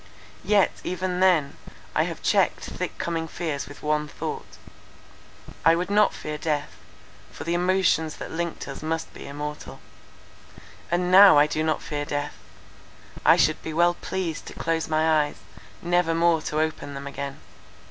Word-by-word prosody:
Yet, 205 -2 +3
even 180 0 -2
then, 170 -7 +3 0.4
I - - +2
have - - -6
checked - - +2
thick - - -5
coming 165 -1 -2
fears 155 -4 -4
with 145 - -12
one 150 0 0
thought; - - -6 1.1
I 165 - +6
would 180 +3 -2
not 210 0 +4
fear 150 0 -6
death, 150 -2 -1 0.6
for - - -8
the 170 - -1
emotions 175 -3 +2
that - - -8
linked 170 0 -4
us 140 - -7
must 160 +1 -3
be - - -10
immortal. 150 +1 -6 1.1
"And 180 +1 0
now 195 -2 +9
I 145 - +7
do 155 +1 -2
not 155 0 0
fear 145 -1 -3
death. 145 0 -3 0.9
I - - +6
should - - +2
be 160 - -5
well 175 +2 +4
pleased 175 -3 -4
to - - -8
close 165 0 -1
my 155 -1 +3
eyes, 145 - -9 0.5
never 175 -1 +2
more 165 -1 +3
to 155 0 -2
open 155 -2 -2
them 140 0 -7
again. 140 0 -6
160 Hz, 160 wpm, -25 LUFS, 150-175 Hz, 1.1 s, now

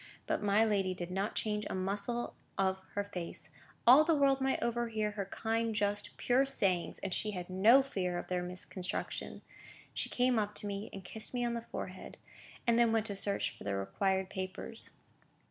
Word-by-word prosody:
But - - 0
my 205 +2 +4
lady 195 -4 +1
did 175 0 -5
not 195 +3 -1
change 210 -1 -1
a - - -2
muscle 200 +5 -1 0.2
of 190 -1 +2 0.2
her 205 - +1
face. 175 -4 -5 0.3
All 260 +6 +9
the 325 0 +3
world 275 -2 +3
might 265 0 +1
overhear 230 -3 0
her 205 -2 -3
kind, 225 +2 -1
just, 205 0 -1
pure 250 +2 +3
sayings, 190 -10 +1
and 195 -2 -1
she 215 - 0
had 180 0 -6
no 225 +9 +7
fear 180 -9 -2
of - - -4
their 180 -1 -1
misconstruction. 180 +1 -3 0.5
She - - -1
came 250 -2 +3
up 210 0 -2
to - - -6
me, 200 +1 -4
and 195 - -8
kissed 220 +6 -5
me 245 -1 +1
on 235 - 0
the 235 0 -5
forehead, - - -6 0.5
and 235 0 +4
then 235 -1 +5
went 225 -1 +2
to 205 -2 -2
search 200 +1 -1
for - - -11
the 100 -1 -1
required 190 - 0
papers. 190 +4 -5
205 Hz, 190 wpm, -33 LUFS, 190-235 Hz, 0.5 s, All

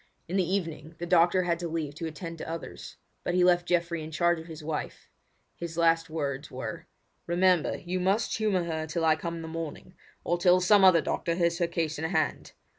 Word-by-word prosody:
In 175 - -4
the 190 - +3
evening 165 -4 -4
the 175 - -4
doctor 175 +1 +4
had 170 -1 0
to 175 - -3
leave 160 -3 -3
to 165 +2 -5
attend 165 +1 -7
to - - -6
others; 165 -1 -7 0.3
but 175 - -1
he 180 - +4
left 175 -1 +3
Geoffrey 170 -1 0
in 155 - -6
charge 170 +1 +1
of 160 - -10
his 160 -2 -9
wife. 150 -1 -5 0.5
His 170 -1 -6
last 165 -1 +3
words 145 -3 -3
were: - - -6 0.4
"Remember, 180 -1 +2
you 180 +1 -3
must 195 +5 +1
humour 210 -5 +1
her 160 -2 -3
till 165 +1 -1
I 160 -1 +5
come 170 +1 -4
in 165 - -6
the - - -6
morning, 165 +2 -6 0.3
or 175 0 0
till 180 0 +5
some 195 +2 +5
other 185 -3 +7
doctor 170 +1 -1
has 170 0 +1
her 170 - +2
case 160 -2 -2
in 160 - -2
hand. 175 - -1
170 Hz, 215 wpm, -28 LUFS, 160-180 Hz, 0.5 s, other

